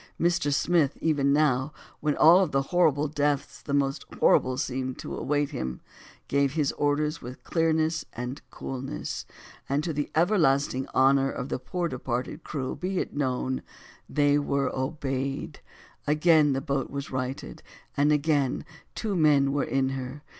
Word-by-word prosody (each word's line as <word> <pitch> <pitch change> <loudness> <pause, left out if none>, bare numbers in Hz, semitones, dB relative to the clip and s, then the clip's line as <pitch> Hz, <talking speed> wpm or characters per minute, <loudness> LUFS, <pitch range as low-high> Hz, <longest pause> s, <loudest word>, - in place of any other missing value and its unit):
Mr. 170 -3 +2
Smith, 155 -1 +2
even 145 -3 +2
now, 145 -1 +2 0.3
when 150 -1 0
of 170 -1 +6
all 135 - +4
horrible 155 -2 +2
deaths 145 -1 -1
the - - -7
most 140 -1 +1 0.2
horrible 130 0 +4
seemed 130 -2 -3
to - - -6
await 145 0 0
him, 65 - -4 0.5
gave 140 -1 +1
his 150 -3 +1
orders 150 +2 0
with 125 +2 -9
clearness 160 -1 +1
and 125 +3 -5
coolness; 130 - -5 0.4
and 140 +2 +1
to 165 - -2
the 145 0 -2
everlasting 145 -7 +2
honor 135 +1 +4
of 130 - -5
the - - -2
poor 170 +7 -2
departed 130 +2 -4
crew 130 -3 -4
be 185 +1 -3
it - - -3
known, 130 -2 -1 0.5
they 145 0 +3
were 140 -2 -1
obeyed; 135 -1 -3 0.5
again 150 -1 +4
the 135 - -1
boat 140 -1 -2
was 140 0 -5
righted, 130 0 -4 0.3
and 145 +1 +3
again 145 -3 +1 0.3
two 215 -3 -2
men 145 -4 +4
were 145 0 +1
in 130 +1 0
her. 135 +2 -6
140 Hz, 150 wpm, -27 LUFS, 135-155 Hz, 0.5 s, of